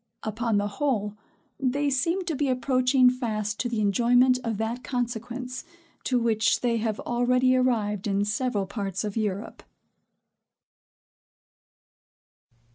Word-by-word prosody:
Upon 220 0 -1
the 205 0 +1
whole, 210 -3 -1 0.4
they 280 +2 0
seem 335 +8 0
to 330 -4 -2
be 280 0 0
approaching 255 0 +3
fast 215 -5 -1
to 245 - -1
the 230 -2 -1
enjoyment 245 +5 +4
of 225 -3 -2
that 225 +3 -3
consequence, 245 +1 -4 0.4
to 255 - +2
which 230 -1 +2
they 235 -2 +1
have 220 -1 -2
already 250 +1 +2
arrived 220 -6 0
in 200 0 +1
several 210 -1 -1
parts 195 -1 -4
of 210 -2 -4
Europe. 205 -3 -3
240 Hz, 120 wpm, -26 LUFS, 210-255 Hz, 0.4 s, enjoyment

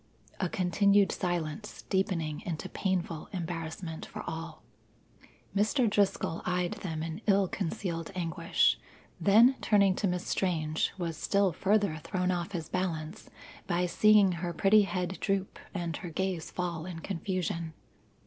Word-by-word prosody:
A 185 - 0
continued 200 +1 +3
silence, 175 +2 -3
deepening 180 -6 -1
into 165 -3 -4
painful 175 -4 -2
embarrassment 165 -2 -5
for - - -7
all. 165 +1 -6 0.9
Mr. 220 +5 +3
Driscoll 200 -5 +1
eyed 180 -1 0
them 160 -4 -3
in 165 +5 -5
ill 200 -1 +4
concealed 175 -3 -3
anguish, 170 -1 +2 0.4
then 230 +6 +6
turning 200 -3 +4
to 205 - +1
Miss 180 0 -2
Strange 160 -4 0
was 170 -4 -3
still 200 -2 +2
further 200 -2 +2
thrown 180 +3 -1
off 175 +2 -2
his 165 -3 -3
balance 175 -1 -3 0.4
by 175 0 +1
seeing 205 +2 +5
her 175 0 -3
pretty 200 +5 +5
head 185 -2 -2
droop 195 -1 -1
and 170 -4 -3
her 180 - -6
gaze 180 0 -2
fall 175 -2 -3
in 180 -3 -6
confusion. 170 -3 -3
180 Hz, 135 wpm, -30 LUFS, 165-195 Hz, 0.9 s, then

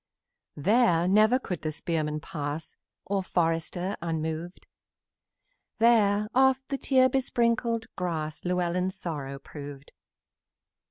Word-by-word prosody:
Here 180 - +3
never 215 +5 +5
could 180 - -5
the 155 - -2
spearman 155 -1 -2
pass, 150 +1 -5 0.3
Or 195 0 0
forester, 175 +2 -1
unmoved! 160 +1 -4 1.1
Here 210 -3 +4
oft 265 0 +3
the 275 -1 -2
tear 260 -1 +4
besprinkled 235 -3 0
grass 160 -4 -3
Llewellyn's 180 +1 0
sorrow 145 -7 -5
proved. 145 0 -10
180 Hz, 100 wpm, -28 LUFS, 160-230 Hz, 1.1 s, never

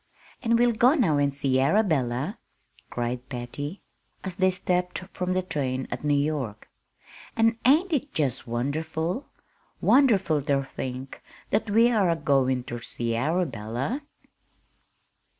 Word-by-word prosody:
"And 230 -2 +3
we'll 240 0 +4
go 245 +6 +5
now 195 - +3
and 140 0 +2
see 135 -1 +1
Arabella!" 135 - +1 0.5
cried 120 +1 -3
Patty, 140 +7 -5 0.4
as 190 -2 -5
they 185 -1 +4
stepped 180 -1 -1 0.2
from 185 0 -1
the 185 0 0
train 130 -7 -2
at - - -4
New 145 -1 +2
York. 140 -8 -3 0.7
"An' 225 0 +2
ain't 320 +8 +4
it 290 -1 -1
jest 140 -8 -1
wonderful 160 - -2 0.5
wonderful 200 - +4
ter 140 0 +1
think 130 0 -6 0.3
that 210 +1 +1
we 230 +4 +5
are 205 -6 +3
a 165 - +3
goin' 130 -5 +1
ter 120 -1 -6
see 115 0 -3
Arabella!" 135 - -1
155 Hz, 135 wpm, -26 LUFS, 130-205 Hz, 0.7 s, go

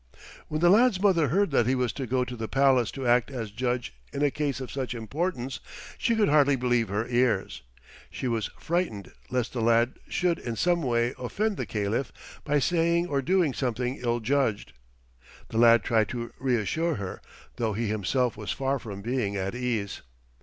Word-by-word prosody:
When 155 +1 -3
the 175 0 +6
lad's 225 -1 +5
mother 185 -6 +3
heard 190 +6 +1
that 120 -4 +3
he 130 - +2
was 125 -3 0
to 135 -3 -4
go 125 +1 +1
to 125 - -6
the 110 -1 -4
palace 135 -3 +3
to 135 -2 -5
act 120 0 +3
as 115 -6 -5
judge 120 - -2 0.2
in 140 - -2
a 145 - +3
case 145 -3 -2
of 130 - -6
such 130 -2 -3
importance 130 - -3 0.4
she 235 - +1
could 215 -2 +3
hardly 145 -1 +4
believe 120 -2 +1
her 105 +4 -1
ears. 120 - +1 0.5
She 130 - -4
was 115 -3 -1
frightened 170 - -2 0.2
lest 125 -2 -1
the 120 - -2
lad 115 +2 +2
should 175 -2 0
in 120 -2 -4
some 175 +5 +2
way 120 -2 +1
offend 205 - -1
the - - -3
Caliph 110 +5 -1 0.3
by 145 - +1
saying 170 +3 +2
or 140 -2 +1
doing 170 -1 +2
something 125 0 -2
ill 120 -1 -1
judged. 115 - 0 0.8
The 115 - -1
lad 115 -1 +6
tried 110 -2 +2
to 120 -1 -5
reassure 135 - 0
her, 95 -5 -6 0.4
though 110 -2 0
he 115 +3 -2
himself 110 +4 0
was 105 -1 -5
far 135 0 -1
from 100 -4 -8
being 115 -4 -1
at 95 +1 -2
ease. 120 -5 -2
125 Hz, 190 wpm, -27 LUFS, 115-145 Hz, 0.8 s, the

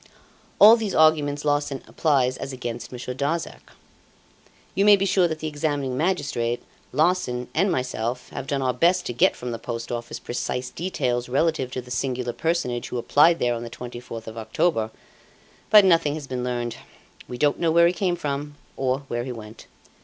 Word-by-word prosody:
All 220 +3 +9
these 215 -4 -3
arguments 150 -2 +3
Larsan 145 -2 0
applies 135 -5 +1
as 135 - -5
against 120 -2 -6
Monsieur 125 0 -5
Darzac. 145 +6 -3 1.0
You 195 - +2
may 205 0 +8
be 195 0 0
sure 185 -2 +3
that 160 -1 -3
the 155 - -4
examining 145 -3 -2
magistrate, 130 -8 -1 0.3
Larsan, 145 -5 +1
and 190 +5 +2
myself, 125 -3 -2
have 135 - -6
done 140 -2 -1
our 130 -1 +1
best 175 +8 +2
to - - -3
get 120 - +3
from 125 0 -5
the 115 - -5
Post 115 +1 -5
Office 120 -1 -4
precise 125 +1 -4
details 125 -9 -2
relative 140 0 +1
to 130 - -3
the 125 - -13
singular 125 -1 -2
personage 125 -3 -1
who 125 - -3
applied 150 +7 +4
there 120 -5 +1
on 115 - -4
the 120 - -6
24th 120 -1 -8
of 110 0 -7
October. 110 +1 0 0.8
But 210 -1 +8
nothing 165 -5 +3
has 155 -2 -6
been 130 -2 -4
learned. 120 -1 -3 0.5
We 125 - -6
don't 145 +2 +2
know 165 -1 +2
where 170 +1 +6
he 170 - +3
came 180 -1 0
from 145 -2 -4 0.2
or 130 +1 0
where 120 -1 -2
he 130 - -5
went. 110 -2 -10
135 Hz, 185 wpm, -24 LUFS, 120-160 Hz, 1.0 s, All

